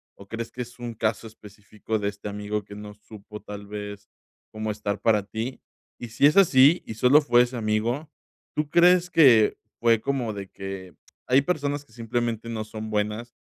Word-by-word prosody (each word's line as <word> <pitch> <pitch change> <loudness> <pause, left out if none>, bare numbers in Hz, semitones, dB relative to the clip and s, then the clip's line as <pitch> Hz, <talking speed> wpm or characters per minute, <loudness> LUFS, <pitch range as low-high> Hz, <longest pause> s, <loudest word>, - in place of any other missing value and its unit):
o 100 - -15
crees 115 +2 -6
que 125 - -6
es 120 0 -8
un 120 -1 -6
caso 110 0 -2
específico 110 0 -7
de 100 -1 -1
este 100 0 -8
amigo 105 +1 -4
que 100 0 -12
no 105 0 -9
supo 105 0 -12
tal 105 0 -9
vez 105 0 -8 0.5
cómo 110 0 -4
estar 105 -1 -3
para 105 -3 +3
ti? 110 +5 -5 0.4
Y 120 - -7
si 115 - +2
es 150 - +5
así, 155 -4 +6
y 110 - -6
solo 130 +7 +5
fue 120 -3 +4
ese 125 +1 -5
amigo, 115 +7 -1 0.5
¿tú 150 -1 -1
crees 180 +1 +5
que 125 -11 +6 0.2
fue 115 -2 +3
como 125 -5 -2
de 100 -1 -7
que? 95 -2 -8 0.3
Hay 130 +2 +5
personas 145 -3 -2
que 115 - -25
simplemente 115 -1 -3
no 110 -2 -3
son 110 0 -7
buenas 105 +3 -3
110 Hz, 185 wpm, -25 LUFS, 105-125 Hz, 0.5 s, así